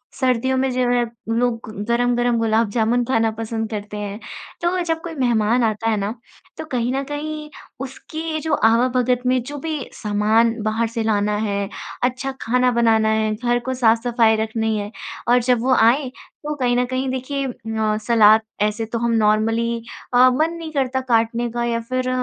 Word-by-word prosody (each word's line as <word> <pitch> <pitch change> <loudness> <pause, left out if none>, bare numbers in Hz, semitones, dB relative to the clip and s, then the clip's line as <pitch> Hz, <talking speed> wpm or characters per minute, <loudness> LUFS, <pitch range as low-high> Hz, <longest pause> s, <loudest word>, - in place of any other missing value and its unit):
सर्दियों 260 0 +1
में 265 0 +1
जो 255 0 -1
है 245 0 +2 0.3
लोग 240 -2 0 0.3
गरम-गरम 240 0 +2
गुलाब 225 -1 +2
जामुन 235 +2 +1
खाना 225 -3 +1
पसंद 225 0 -3
करते 210 -1 -5
हैं। 205 +1 -5 0.4
तो 350 +2 +1
जब 325 -1 -1
कोई 335 -1 -6
मेहमान 240 -2 +2
आता 225 +1 0
है 215 - +1
ना 205 +2 -2 0.4
तो - - -5
कहीं 245 0 0
न 275 +1 -1
कहीं 300 +1 -5 0.4
उसके 315 +4 -5
जो 315 -1 -2
आवा 230 +1 +4
भगत 250 0 +1
में 255 0 +2
जो 290 - -6
भी 320 - -1 0.2
सामान 215 +2 +2
बाहर 220 +1 0
से 230 0 -3
लाना 210 -1 +1
है, 200 -2 -2 0.3
अच्छा 255 +2 -1
खाना 250 +2 +2
बनाना 225 -2 +3
है, 220 0 +1
घर 240 +1 0
को 260 +2 -3
साफ-सफाई 230 -1 +3
रखनी 220 0 -1
है 205 +1 -4 0.4
और 245 +1 +5
जब 245 -1 +2
वो 260 0 +3
आएँ 250 +4 +3 0.4
तो 300 0 -2
कहीं 245 -3 +1
न 250 - +2
कहीं 255 +1 -2
देखिए 270 +2 -3
अ, 220 -3 -2
सलाद 220 -2 +6 0.2
ऐसे 210 +2 0
तो 225 +1 -4
हम 235 0 0
नॉर्मली 225 +1 +2 0.4
अ, 255 +1 +7
मन 310 +6 +1
नहीं 330 -2 -7
करता 260 -3 0
काटने 230 +1 +1
का 240 0 -2
या 235 -1 0
फिर 255 0 -1
235 Hz, 180 wpm, -21 LUFS, 220-255 Hz, 0.4 s, अ